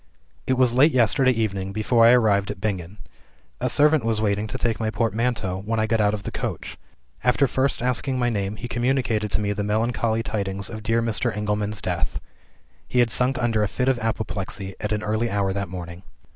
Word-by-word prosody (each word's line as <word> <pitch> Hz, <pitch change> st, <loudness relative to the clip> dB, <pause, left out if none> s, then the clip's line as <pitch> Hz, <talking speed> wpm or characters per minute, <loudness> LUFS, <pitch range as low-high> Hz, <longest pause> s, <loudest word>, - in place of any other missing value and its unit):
"It 130 Hz, -, +3 dB
was 125 Hz, -2 st, +3 dB
late 145 Hz, +6 st, +5 dB
yesterday 130 Hz, +2 st, +4 dB
evening 100 Hz, -5 st, -1 dB
before 115 Hz, +2 st, +4 dB
I -, -, +8 dB
arrived 105 Hz, -5 st, +3 dB
at 105 Hz, -2 st, -5 dB
Bingen. 95 Hz, -2 st, -3 dB, 0.6 s
A -, -, 0 dB
servant 150 Hz, -2 st, +4 dB
was 115 Hz, -1 st, 0 dB
waiting 105 Hz, 0 st, 0 dB
to -, -, -5 dB
take 115 Hz, -2 st, -1 dB
my 110 Hz, -1 st, 0 dB
portmanteau, 110 Hz, -3 st, -1 dB
when 110 Hz, +2 st, -1 dB
I 110 Hz, -, +2 dB
got 110 Hz, 0 st, +1 dB
out 105 Hz, 0 st, +2 dB
of 100 Hz, -, -8 dB
the -, -, -5 dB
coach. -, -, -5 dB, 0.4 s
After 125 Hz, +3 st, +3 dB
first 130 Hz, 0 st, 0 dB
asking 125 Hz, +2 st, 0 dB
my 120 Hz, -1 st, +1 dB
name, 100 Hz, -1 st, -2 dB
he 110 Hz, +4 st, -6 dB
communicated 120 Hz, -3 st, 0 dB
to -, -, 0 dB
me 105 Hz, -1 st, -1 dB
the 105 Hz, 0 st, -3 dB
melancholy 110 Hz, +1 st, 0 dB
tidings 100 Hz, -2 st, -3 dB
of 110 Hz, -1 st, -6 dB
dear 115 Hz, +2 st, +1 dB
Mr. 110 Hz, -3 st, 0 dB
Engelman's 105 Hz, -1 st, -2 dB
death. 85 Hz, -3 st, -2 dB, 0.7 s
He -, -, -3 dB
had 120 Hz, -2 st, +4 dB
sunk 130 Hz, +3 st, +1 dB
under 115 Hz, -3 st, +1 dB
a 105 Hz, -, +2 dB
fit 125 Hz, +5 st, -2 dB
of 130 Hz, -2 st, +2 dB
apoplexy, 100 Hz, -3 st, -3 dB
at 105 Hz, -, -3 dB
an 105 Hz, 0 st, -1 dB
early 110 Hz, +2 st, 0 dB
hour 100 Hz, -2 st, 0 dB
that 100 Hz, -1 st, -3 dB
morning. 90 Hz, -1 st, -7 dB
110 Hz, 205 wpm, -23 LUFS, 100-120 Hz, 0.7 s, I